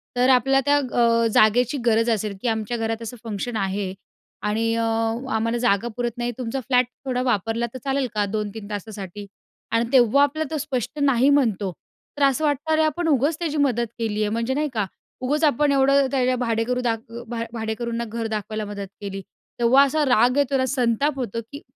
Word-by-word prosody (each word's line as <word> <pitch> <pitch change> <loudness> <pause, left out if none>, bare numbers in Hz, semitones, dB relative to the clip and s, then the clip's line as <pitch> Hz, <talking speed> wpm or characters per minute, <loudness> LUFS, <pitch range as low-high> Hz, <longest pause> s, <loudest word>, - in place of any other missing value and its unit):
तर 250 +1 +3
आपल्याला 270 +1 +4
त्या 290 0 +4
अ, 235 -4 +2
जागेची 245 +5 +4
गरज 230 0 +3
असेल 215 -2 -1
की - - -2
आमच्या 220 +1 -1
घरात 225 0 -2
असं 230 +2 -7
फंक्शन 225 +1 -4
आहे 195 -1 -2 0.5
आणि 225 +2 0
अ, 230 - 0 0.5
आम्हाला 230 +2 0
जागा 230 -2 +1
पुरत 240 -1 -2
नाही 240 0 -1
तुमचा 255 +1 -3
फ्लॅट 250 +1 +2 0.2
थोडा 250 -1 -1
वापरला 230 -1 0
तर 260 - -6
चालेल 270 -1 0
का? 205 -1 +2
2-3 210 0 -4
तासासाठी? 205 -1 -6 0.5
आणि 230 +1 +2
तेव्हा 260 +2 +5
आपल्याला 300 +1 -1
तो - - 0
स्पष्ट 280 0 -3
नाही 275 -1 +4
म्हणतो. 225 -9 +2 0.5
तर 285 - +1
असं 275 +2 +3
वाटणार, 295 +2 0
अरे 315 - +4
आपण 325 +3 -1
उगाच 290 +1 +2
त्याची 315 -3 -2
मदत 240 -4 +1
केली 215 -2 -1
आहे. 210 - +1
म्हणजे 230 +4 -1
नाही 300 +2 0
का? 215 -3 0 0.4
उगाच 290 +5 0
आपण 295 -1 +3
एवढं 275 0 +4
त्याच्या 255 -2 +2
भाडेकरू 230 +2 0
दाख 235 -2 0
अ, 235 +1 -7
भा 235 0 -4
भाडेकरूंना 230 +1 -3
घर 230 +1 -3
दाखवायला 215 0 -3
मदत 200 -1 -6
केली. 195 -1 -5 0.4
तेव्हा 245 +4 +6
असा 295 +2 +1
राग 250 0 +3
येतो 280 -1 +2
ना. 260 - +1
संताप 255 +3 +1
होतो 230 -2 -3
की 285 +1 -8
240 Hz, 190 wpm, -23 LUFS, 220-270 Hz, 0.5 s, तेव्हा